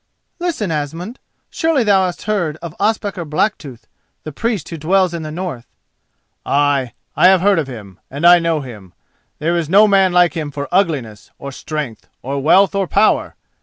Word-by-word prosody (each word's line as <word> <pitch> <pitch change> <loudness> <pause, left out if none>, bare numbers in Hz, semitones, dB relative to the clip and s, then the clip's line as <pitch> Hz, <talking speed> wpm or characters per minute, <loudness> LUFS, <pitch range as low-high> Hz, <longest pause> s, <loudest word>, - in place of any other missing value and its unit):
"Listen, 325 - -2
Asmund! 165 - -4 0.3
Surely 320 -6 +1
thou 195 -3 +3
hast 175 -5 -5
heard 175 -8 -1
of 165 -1 -8
Ospakar 205 -3 -1
Blacktooth—the 155 - -5
priest 210 +1 -3
who 165 - -6
dwells 180 +3 +1
in 170 - -4
the 155 - -6
north?" 160 -7 -6 0.8
"Ay, 140 -3 +1 0.2
I 180 - +5
have 190 -1 +5
heard 200 -2 +3
of 150 - -2
him, 105 -7 -10
and 145 +5 -4
I 175 0 +8
know 165 -2 0
him; 105 -9 -11 0.4
there 165 +3 -1
is 165 -3 -2
no 205 +4 +6
man 195 -2 +3
like 175 -1 +3
him 155 -3 -4
for 145 0 -5
ugliness, 150 - -1
or 140 - -8
strength, 140 -3 -6 0.2
or 140 +2 -3
wealth 190 +7 +4
and 195 -2 -1
power. 210 +2 +2
170 Hz, 170 wpm, -17 LUFS, 145-195 Hz, 0.8 s, I